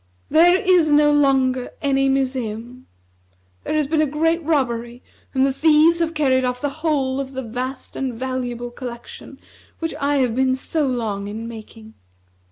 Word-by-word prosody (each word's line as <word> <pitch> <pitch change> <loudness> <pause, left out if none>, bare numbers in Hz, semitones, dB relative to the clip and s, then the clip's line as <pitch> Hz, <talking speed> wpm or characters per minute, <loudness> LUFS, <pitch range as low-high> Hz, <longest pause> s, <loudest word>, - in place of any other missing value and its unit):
There 350 +4 +5
is 360 -5 +3
no 295 0 +5
longer 265 -3 +2
any 270 -1 +1
museum. 255 -2 -3 0.8
There - - -2
has 305 -1 +2
been 310 +2 +1
a 310 - +2
great 325 +4 0
robbery, 240 -6 -1 0.3
and 265 0 +4
the 270 - 0
thieves 315 +3 +4
have 330 -1 -1
carried 260 -4 +2
off 250 0 -1
the 290 - -1
whole 275 -5 0
of 270 -1 -5
the 265 0 -4
vast 255 +3 -6
and 260 -3 -3
valuable 245 -1 -4
collection 240 -1 -9 0.4
which 325 0 -3
I 285 +1 +1
have 255 -4 +1
been 260 0 +2
so 295 +3 -1
long 220 -6 -2
in 220 +3 -6
making." 220 -1 -11
265 Hz, 165 wpm, -21 LUFS, 245-300 Hz, 0.8 s, There